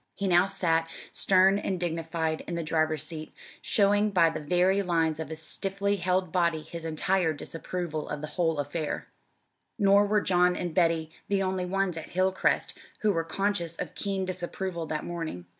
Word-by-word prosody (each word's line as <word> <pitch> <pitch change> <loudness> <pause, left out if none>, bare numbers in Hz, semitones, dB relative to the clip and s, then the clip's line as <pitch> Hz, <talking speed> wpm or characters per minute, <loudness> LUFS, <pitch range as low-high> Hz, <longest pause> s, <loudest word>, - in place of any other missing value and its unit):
He 195 - -2
now 180 +1 +5
sat, 165 -4 +1 0.2
stern 190 +1 +5
and 190 -3 -2
dignified, 165 -1 -2
in 170 - -3
the 170 - -2
driver's 155 -1 +1
seat, 155 -1 -6 0.3
showing 205 0 +3
by 170 -5 +4
the 155 - -4
very 180 +6 +2
lines 165 -4 +1
of 160 - -4
his 160 0 -5
stiffly 200 +4 -1
held 180 -1 0
body 170 -3 +1
his 165 0 -8
entire 165 +1 +1
disapproval 165 0 -5
of 145 - -4
the 155 - -4
whole 165 -3 +1
affair. 145 +2 -3 0.7
Nor 200 -1 +5
were 210 0 +2
John 180 -1 +3
and 175 -2 -3
Betty 165 -2 +2 0.2
the 200 -1 +1
only 185 -1 -1
ones 195 -2 0
at 165 - -7
Hilcrest 185 +1 +1 0.3
who 215 - +3
were 165 -4 0
conscious 175 -1 -1
of - - -5
keen 195 -2 -2
disapproval 180 -1 -4
that 155 -1 -3
morning. 165 - -5
175 Hz, 175 wpm, -28 LUFS, 160-190 Hz, 0.7 s, now